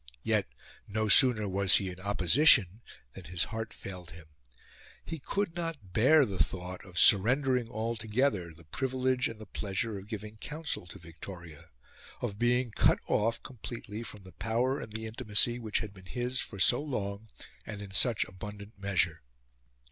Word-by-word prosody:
Yet, - - +1 0.4
no 110 +1 -1
sooner 115 -3 +7
was 95 0 +4
he 95 -2 +1
in 90 - -11
opposition 100 - +4 0.3
than - - -11
his 90 +1 0
heart 110 0 -5
failed 90 -3 -8
him. 85 -2 -12 0.8
He 165 - -5
could 195 +4 -2
not 165 - -5
bear 140 +7 +5
the 95 -7 +1
thought 90 0 -7
of 90 -3 -11
surrendering 125 +5 +4
altogether 110 -3 -1
the 80 +1 -16
privilege 130 - 0
and 115 - -8
the 110 - -9
pleasure 100 +1 -3
of 95 - -13
giving 105 0 -7
counsel 150 - -4
to - - -10
Victoria 85 -1 -11 0.5
of 100 +1 -4
being 120 0 +2
cut - - +4
off 115 +2 +1
completely 115 -3 -7
from 105 -4 -9
the 95 - -13
power 120 +6 0
and - - -8
the 110 +1 -4
intimacy 110 +2 +1
which 110 -3 -1
had 105 -3 -6
been 95 -1 -15
his 125 +3 -2
for 100 - -6
so 120 +7 +4
long 105 -7 -4 0.3
and 105 - -7
in 100 -1 -8
such 110 +3 +2
abundant 100 +2 -10
measure. 90 -5 0
105 Hz, 165 wpm, -30 LUFS, 95-120 Hz, 0.8 s, sooner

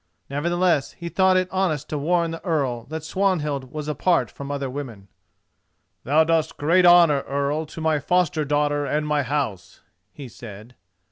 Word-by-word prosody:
Nevertheless, 170 +1 0
he 170 -1 -7
thought 190 +1 +3
it 185 0 +1
honest 170 -6 -1
to 150 - -2
warn 170 +2 +1
the 165 - -7
Earl 135 - -1
that 160 +1 -6
Swanhild 150 -8 -1
was 150 0 -6
apart 150 - +1
from 140 0 -8
other 140 -1 -3
women. 125 -8 -8 1.0
"Thou 150 +5 +4
dost 160 -1 0
great 175 +5 +4
honour, 170 -5 +6
earl, 140 +3 -1
to 160 - -9
my 160 -1 +1
foster 165 0 +1
daughter 145 0 0
and 150 +1 -1
my 150 -1 +1
house," 135 -8 -4 0.3
he 140 -3 -10
said. 110 0 -11
150 Hz, 160 wpm, -23 LUFS, 140-170 Hz, 1.0 s, honour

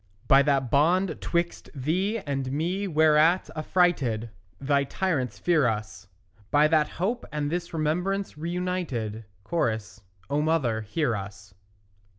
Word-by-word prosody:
By 135 0 +7
that 135 -3 +1
bond 175 +6 +2
'twixt 170 0 -2
thee 180 - 0
and 135 -9 -3
me 175 +8 -1
whereat 155 +1 +3
affrighted 150 -9 +1 0.3
Thy 140 0 +2
tyrants 135 - -2
fear 160 -3 +2
us; 105 -4 -4 0.4
By 150 +1 +5
that 155 -2 +3
hope 220 +8 -2
and 150 -1 -2
this 175 0 -3
remembrance 180 +5 -1
reunited; 160 - -3 0.2
(Cho.) 140 -10 +1 0.5
O 145 +2 0
mother, 145 -8 +1
hear 120 +3 -1
us. 100 0 -8
150 Hz, 125 wpm, -26 LUFS, 130-175 Hz, 0.5 s, By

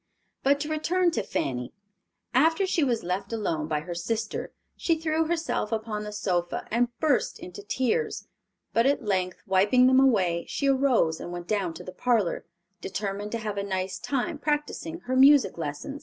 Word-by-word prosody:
But 280 +1 +3
to 300 - -2
return 345 +3 +1
to - - -1
Fanny. 125 -2 -3 0.6
After 320 +9 +4
she 350 -4 +1
was 240 -5 0
left 190 +4 -3
alone 165 -9 -1
by 150 -1 -1
her 175 +3 -6
sister, 215 +6 -3 0.2
she 330 -2 0
threw 320 0 +1
herself 325 -9 -1
upon 220 -1 -2
the 210 - -5
sofa, 180 -5 -1
and 240 +2 +3
burst 300 -5 +1
into 180 +3 -9
tears; 255 - -1 0.5
but 230 +3 +4
at 280 -3 +1
length, 185 -3 -1
wiping 200 +7 +4
them 260 +1 +6
away, 190 -10 +2
she 280 - -1
arose 260 -12 +3
and 175 - -6
went 175 0 -6
down 195 -6 -1
to - - -8
the 185 - -8
parlor, 215 -4 0 0.3
determined 200 +2 -4
to - - 0
have 205 -1 -2
a - - -2
nice 185 -1 -3
time 285 - -2
practicing 300 +3 -2
her 255 +1 -2
music 275 -6 +6
lesson. 160 - -5
220 Hz, 175 wpm, -27 LUFS, 185-280 Hz, 0.6 s, them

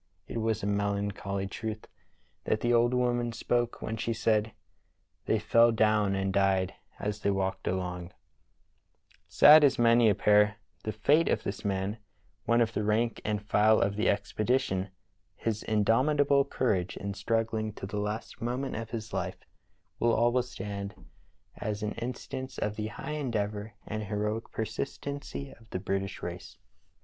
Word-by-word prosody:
It 115 - -4
was 110 -2 0
a - - 0
melancholy 100 -1 -1
truth 110 +2 -5 0.6
that 110 - 0
the 120 0 +2
old 120 +1 +4
woman 120 -1 +1
spoke 120 +1 -1
when 110 - -3
she 115 +1 -1
said: 110 -1 +1 0.4
* - - -46
They - - +3
fell 115 0 +4
down 110 -3 +2
and 95 0 -1
died 95 -1 +2 0.3
as 105 0 -3
they 100 - 0
walked 95 -1 -1
along' 90 -1 -3 0.6
" - - -36
Sad 150 +1 +10
as 140 - +4
may 115 -1 +5
appear 105 +1 +4 0.3
the 110 - -2
fate 145 +10 +3
of - - +1
this 100 - -4
man, 100 +2 -2 0.5
one 115 0 +3
of 115 -1 +1
the 105 - -1
rank 110 +2 +1
and 105 0 -2
file 110 +1 +4
of 100 0 +1
the 105 - +2
expedition, 105 -2 0 0.5
his 110 -2 -2
indomitable 140 +6 +3
courage 100 -10 -1
in 100 0 -4
struggling 115 0 -1
to 95 - -7
the 105 +1 -3
last 105 +2 -4
moment 125 +3 -2
of 115 0 -5
his 110 -1 -6
life 90 0 -4 0.5
will 115 0 +3
always 120 +2 +2
stand 100 -2 -5 0.6
as 105 -1 -3
an 105 - -1
instance 125 +2 -6
of 105 0 -2
the 105 0 -3
high 115 - -6
endeavor 110 -7 -2
and 110 0 -4
heroic 105 +2 -2
persistency 140 +5 -4
of 115 -3 -18
the - - -3
British 95 +1 -3
race. - - -7
110 Hz, 160 wpm, -29 LUFS, 100-115 Hz, 0.6 s, Sad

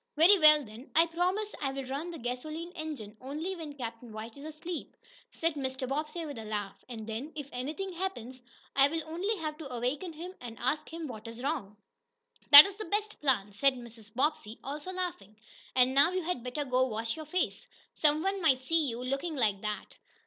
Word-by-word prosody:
"Very 365 +6 +7
well, 305 -2 +7
then. 220 +5 -12
I 330 +1 +7
promise 365 +5 -1
I'll 270 -1 -2
run 280 +6 -4
the 340 - -6
gasoline 310 +8 -5
engine 300 - -6
only 305 +8 -4
when 305 -4 -8
Captain 230 -1 -6
White 220 +1 -7
is 280 +1 -10
asleep," 315 +2 -6 0.3
said 330 0 -1
Mr. 265 -2 -3
Bobbsey, 305 +5 -3
with 285 -6 -6
a - - -6
laugh. 210 -2 -4
"And 225 -3 -6
then, 225 +8 -5
if 290 -3 -5
anything 305 +10 -4
happens, 260 -9 -4 0.3
I'll 290 +4 +3
only 365 +7 -1
have 310 -2 -4
to 285 -5 -7
awaken 255 +9 -2
him, 345 +4 -7
and 235 -2 -8
ask 295 +6 -1
him 330 0 -5
what 225 -5 -7
is 230 +2 -8
wrong." 265 -9 -2 0.7
"That's 300 +8 +12
the 435 - -5
best 420 +4 -2
plan," 225 -8 +1
said 265 +6 +3
Mrs. 230 -3 -11
Bobbsey, 245 -3 -1
also 295 +6 -5
laughing. 350 - -4 0.4
"And 255 0 +5
now 285 +5 +5
you 370 -1 -1
had 320 -8 -2
better 255 +4 -3
go 255 -1 +2
wash 225 +1 -2
your 315 -1 -7
face. 360 +4 -1 0.3
Some 305 +1 +3
one 390 0 0
might 265 -6 +4
see 310 +1 +2
you 235 +1 -5
looking 275 +6 -2
like 210 -7 +1
that." 210 -1 -4
285 Hz, 190 wpm, -31 LUFS, 245-330 Hz, 0.7 s, That's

